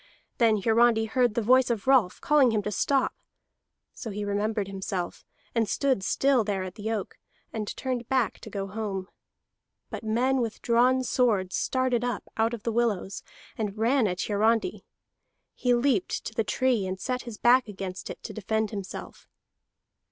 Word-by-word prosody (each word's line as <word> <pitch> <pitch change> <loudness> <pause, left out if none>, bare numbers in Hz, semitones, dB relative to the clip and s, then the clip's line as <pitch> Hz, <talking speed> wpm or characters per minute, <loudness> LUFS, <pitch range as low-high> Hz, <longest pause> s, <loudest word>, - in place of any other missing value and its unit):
Then 225 -3 +4
Hiarandi 225 0 +4
heard 240 0 +1
the 235 - +1
voice 255 +3 +5
of 230 -4 -1
Rolf, 260 -9 +3
calling 295 -4 +4
him 215 -2 0
to 210 - -3
stop; 270 +7 +1 0.8
so 230 - -7
he 205 0 -4
remembered 205 0 -1
himself, 190 -2 -4 0.3
and 225 -3 +1
stood 270 -7 +1
still 265 +4 +2
there 200 -2 -2
at 185 -1 -6
the 215 +2 -5
oak, 210 -4 -4 0.3
and 215 -2 -3
turned 250 -3 -3
back 260 -3 +1
to - - -10
go 195 -1 -3
home. 195 -2 -4 0.8
But - - -6
men 250 +4 +1
with 225 -2 -3
drawn 250 +2 +3
swords 215 -8 +1
started 255 -2 0
up 245 -3 -2
out 225 +1 +1
of 215 - -12
the 230 - -1
willows, 220 -4 -1 0.3
and 210 -2 -3
ran 235 +2 +3
at 180 -1 -2
Hiarandi. 225 - +1 0.7
He 245 -1 +2
leaped 240 -6 0
to - - -5
the 225 - 0
tree, 240 -3 +1
and 185 0 -4
set 255 +4 -2
his 235 -3 -8
back 245 +2 +4
against 190 -2 -6
it - - -8
to - - -6
defend 220 +1 -1
himself. 200 -3 -7
225 Hz, 170 wpm, -27 LUFS, 205-245 Hz, 0.8 s, voice